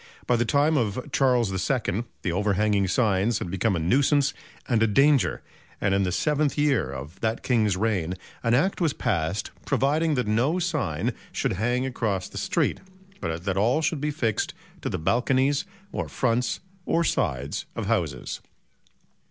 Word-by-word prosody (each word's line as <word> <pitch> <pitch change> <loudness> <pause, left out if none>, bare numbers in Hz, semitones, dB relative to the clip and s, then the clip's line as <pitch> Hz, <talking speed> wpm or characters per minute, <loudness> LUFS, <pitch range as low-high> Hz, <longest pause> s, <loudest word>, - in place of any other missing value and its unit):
By 125 - +3
the 120 0 +1
time 145 +6 +3
of 115 0 -2
Charles 125 -6 +3 0.2
II 115 -5 0 0.2
the 90 - 0
overhanging 100 +1 +1
signs 105 +1 +2
had 85 - -4
become 95 +2 +1
a - - 0
nuisance 140 - +3 0.3
and 115 -3 +2
a 115 - +5
danger, 140 +5 +3 0.4
and 100 -1 +1
in 100 - +2
the 90 -2 0
seventh 150 - +1
year 140 - +2
of 70 +7 -8
that 110 0 -1
King's 110 -7 +2
reign 95 -5 0 0.3
an 115 +1 +2
Act 185 +9 +1
was 160 -4 +2
passed 95 -2 -1
providing 150 +3 +1
that 125 - 0
no 120 +11 +2
sign 125 - -1 0.2
should - - -1
hang 120 +6 0
across 110 -7 -1
the - - -6
street, - - 0 0.4
but 80 -1 -3
that 95 -1 0
all 120 +10 +2
should 155 -2 0
be 150 - 0
fixed 120 -8 -1 0.3
to - - -2
the - - -2
balconies 130 - +2 0.3
or - - -3
fronts 125 0 0 0.3
or 170 - +2
sides 65 - -1
of - - -3
houses. - - -1
115 Hz, 165 wpm, -26 LUFS, 95-140 Hz, 0.4 s, a